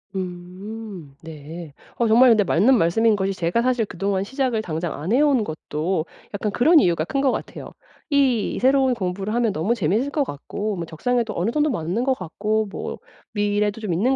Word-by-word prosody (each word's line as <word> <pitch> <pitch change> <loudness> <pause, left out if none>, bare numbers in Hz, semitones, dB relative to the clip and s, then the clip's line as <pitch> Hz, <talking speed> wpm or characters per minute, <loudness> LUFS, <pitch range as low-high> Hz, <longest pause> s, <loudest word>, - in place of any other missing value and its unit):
음. 185 -1 -7
네. 160 0 -9 0.2
어 235 - +2
정말 240 +4 +6
근데 215 -2 +4
맞는 205 +8 +4
말씀인 215 +5 +3
것이 195 -1 -1
제가 180 +4 0
사실 245 -2 +1
그동안 195 0 -2
시작을 255 0 -1
당장 165 -2 -3
안 160 +7 -3
해 245 - +4
온 280 -6 +3
것도 155 0 -3 0.3
약간 205 +1 -2
그런 310 - +5
이유가 170 - +2
큰 275 - -2
것 270 -2 +3
같아요. - - -6 0.4
이 270 -7 +2
새로운 265 0 +3
공부를 195 0 -3
하면 235 -2 +2
너무 180 +10 0
재밌을 215 - 0
것 290 0 0
같고 205 - -4
뭐 170 - -3
적성에도 225 +8 -1
어느 185 +7 0
정도 300 +3 +1
맞는 185 - -1
것 270 - +3
같고 210 +5 -1
뭐 - - -5 0.4
미래도 205 0 0
좀 205 -5 -2
있는 240 +11 +2
210 Hz, 345 characters per minute, -22 LUFS, 175-240 Hz, 0.4 s, 정말